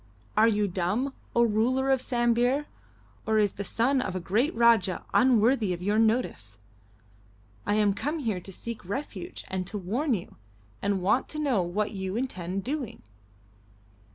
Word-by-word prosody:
"Are 220 +1 +6
you 210 -2 +2
dumb, 195 +9 -1 0.2
O 235 - +5
ruler 245 +5 +2
of 265 -2 +3
Sambir, 245 +3 +1 0.6
or 220 0 +3
is 205 -2 +3
the 200 - -5
son 255 +7 +1
of 185 - -3
a - - -1
great 215 - +1
Rajah 230 -6 +3
unworthy 240 -4 +4
of 175 0 -6
your 205 +3 +2
notice? 220 - 0 1.1
I 205 - +2
am 210 -2 +3
come 295 +10 -2
here 225 - -2
to 195 - -9
seek 230 +4 -7
refuge 280 - -5
and 185 -1 -3
to 205 - -4
warn 235 - 0
you, 180 - -8 0.4
and 200 -2 0
want 235 +7 +2
to 305 - -4
know 270 -10 +2
what 185 +5 -1
you 190 -2 -4
intend 195 -6 -3
doing." 270 -3 -4
220 Hz, 160 wpm, -27 LUFS, 190-255 Hz, 1.1 s, Are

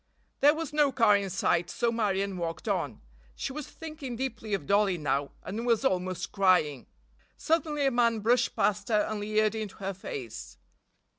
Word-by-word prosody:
There 290 +2 +6
was 320 -2 -5
no 295 -2 +3
car 225 -5 +5
in 200 -1 0
sight 175 -1 +1
so 235 +5 0
Marion 200 -4 0
walked 170 +3 -4
on. 165 - -1 0.3
She 270 - -4
was 300 0 -6
thinking 305 -6 -7
deeply 230 -4 -3
of 180 - -6
Dollie 200 -1 +3
now, 140 -2 -1
and 220 +4 -4
was 240 +1 +2
almost 185 -4 -1
crying. 180 -9 +2 0.5
Suddenly 305 -3 0
a 270 - +3
man 235 -2 +2
brushed 240 +2 +2
past 205 0 +1
her 215 -2 +4
and 215 0 -2
leered 215 +1 +1
into 215 -3 -5
her 195 -1 -4
face. 130 - -7
210 Hz, 170 wpm, -29 LUFS, 185-245 Hz, 0.5 s, There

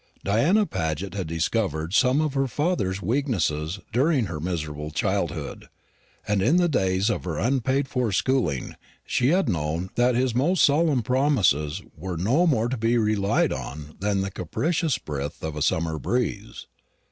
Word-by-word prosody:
Diana 150 - +3
Paget 85 - -3
had 95 -4 -3
discovered 85 0 -1
some 125 +5 +4
of 155 -3 -1
her 135 -1 +1
father's 120 - -1
weaknesses 95 - 0 0.2
during 135 0 +2
her 85 -4 -5
miserable 75 -3 -4
childhood; - - -2 0.6
and 105 -2 +1
in 155 - +3
the 175 -1 +4
days 95 - +1
of - - -3
her 85 -4 -3
unpaid 135 - +1
for 125 -4 -1
schooling 95 - 0 0.3
she 125 - +1
had 185 +6 +3
known 80 +2 -2
that 120 0 +2
his 125 -1 +1
most 155 +9 +2
solemn 145 -4 +3
promises 110 - +1
were 90 +1 -5
no 130 - +2
more 120 -7 +2
to 130 +1 -2
be 115 +2 +1
relied 105 -3 +1
on 75 +2 -7
than 100 0 0
the 95 0 -3
capricious 150 - -1
breath 75 - -6
of 80 -1 -3
a 75 - -4
summer 80 +1 0
breeze. - - -2
105 Hz, 160 wpm, -25 LUFS, 80-135 Hz, 0.6 s, some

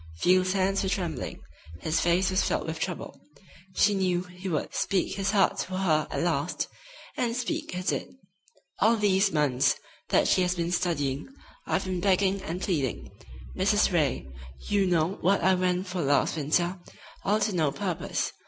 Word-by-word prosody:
Field's 185 - +3
hands 195 0 +1
were 190 - -1
trembling, 175 -8 -3 0.4
his 160 +1 0
face 175 +2 +2
was 185 - +2
filled - - -1
with 160 0 -4
trouble. 180 0 -5 0.5
She 210 - +4
knew 180 -2 +1
he 180 +1 -8
would 155 -4 -2
speak 190 -3 0
his 195 0 -1
heart 195 -2 +2
to 185 0 -3
her 160 -5 +2
at - - -2
last, 165 -1 -1 0.5
and 235 -2 0
speak 245 -6 -3
he 180 - -3
did: 185 - -2 0.6
"All 225 +3 +5
these 195 -1 +3
months 145 -4 +2 0.3
that - - +3
she - - +3
has 180 0 +1
been 170 0 -2
studying 150 - -1 0.4
I've - - 0
been 185 -2 -2
begging 195 0 +2
and 175 -1 -4
pleading, 150 - -2 0.4
Mrs. - - +2
Ray. 65 - +1 0.4
You 200 -2 +2
know 175 +1 +1
what 190 0 +2
I 190 +2 +5
went 180 0 0
for 180 -1 -3
last 140 +3 +2
winter, 170 +5 0 0.4
all 210 +2 +2
to 215 - 0
no 155 -5 +1
purpose. 185 +2 -2
180 Hz, 170 wpm, -27 LUFS, 165-195 Hz, 0.6 s, All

